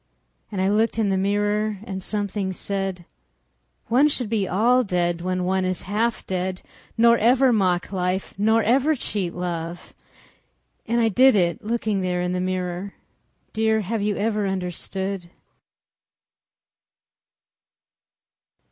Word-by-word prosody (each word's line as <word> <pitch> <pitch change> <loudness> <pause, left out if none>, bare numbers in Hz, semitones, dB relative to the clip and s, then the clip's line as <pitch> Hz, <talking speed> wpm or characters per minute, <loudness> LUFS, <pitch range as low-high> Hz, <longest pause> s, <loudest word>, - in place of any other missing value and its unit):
And 200 - -4
I - - +2
looked 220 +3 +1
in 215 -3 +1
the 195 - +1
mirror 205 +2 0
and 190 -2 -5
something 200 -1 -2
said: 195 -2 -3 0.8
"One 255 +6 +4
should 255 -7 -2
be 210 -4 0
all 240 +7 +3
dead 175 -4 -1
when 185 0 -1
one 190 +1 +1
is 185 0 -1
half 220 +4 -1
dead—" 185 0 -3 0.3
Nor 235 +1 +5
ever 250 +3 +4
mock 185 -4 +1
life, 185 0 -2
nor 220 +3 +2
ever 275 +8 +3
cheat 200 -8 -1
love." 175 -1 -5 0.9
And 235 +1 +1
I 225 -1 +3
did 255 +4 +5
it 180 +4 +1
looking 215 -2 -1
there 180 -1 -1
in 180 - -1
the 180 0 -1
mirror— 185 +1 -3 0.6
Dear, 220 0 +2
have 215 +2 -2
you 205 0 0
ever 210 -1 0
understood? 190 0 -4
200 Hz, 130 wpm, -23 LUFS, 185-220 Hz, 0.9 s, Nor